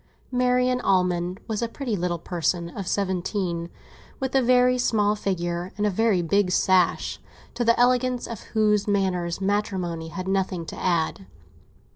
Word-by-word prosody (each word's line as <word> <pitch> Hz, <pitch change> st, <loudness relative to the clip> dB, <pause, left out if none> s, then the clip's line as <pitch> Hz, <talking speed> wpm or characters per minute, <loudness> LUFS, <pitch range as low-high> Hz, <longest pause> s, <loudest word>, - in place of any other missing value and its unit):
Marian 250 Hz, 0 st, +2 dB
Almond 180 Hz, -1 st, +1 dB
was 220 Hz, -1 st, -2 dB
a 235 Hz, -, 0 dB
pretty 240 Hz, -1 st, -3 dB
little 175 Hz, -2 st, -1 dB
person 170 Hz, 0 st, -2 dB
of 190 Hz, +1 st, -7 dB
seventeen, 185 Hz, -3 st, -1 dB, 0.5 s
with 265 Hz, 0 st, -3 dB
a 270 Hz, -, +4 dB
very 250 Hz, 0 st, +4 dB
small 210 Hz, -3 st, +2 dB
figure 175 Hz, -3 st, -2 dB
and 210 Hz, -, 0 dB
a 210 Hz, -, +2 dB
very 205 Hz, -2 st, +2 dB
big 200 Hz, +3 st, +2 dB
sash, 180 Hz, -1 st, +2 dB, 0.3 s
to 240 Hz, -, -1 dB
the 235 Hz, 0 st, +3 dB
elegance 250 Hz, 0 st, +2 dB
of 230 Hz, -, -7 dB, 0.2 s
whose 210 Hz, -1 st, +3 dB
manners 185 Hz, -4 st, 0 dB
matrimony 190 Hz, -5 st, -1 dB
had 185 Hz, +3 st, -6 dB
nothing 190 Hz, -3 st, -1 dB
to -, -, -7 dB
add. 165 Hz, -, -1 dB
195 Hz, 150 wpm, -25 LUFS, 175-230 Hz, 0.5 s, a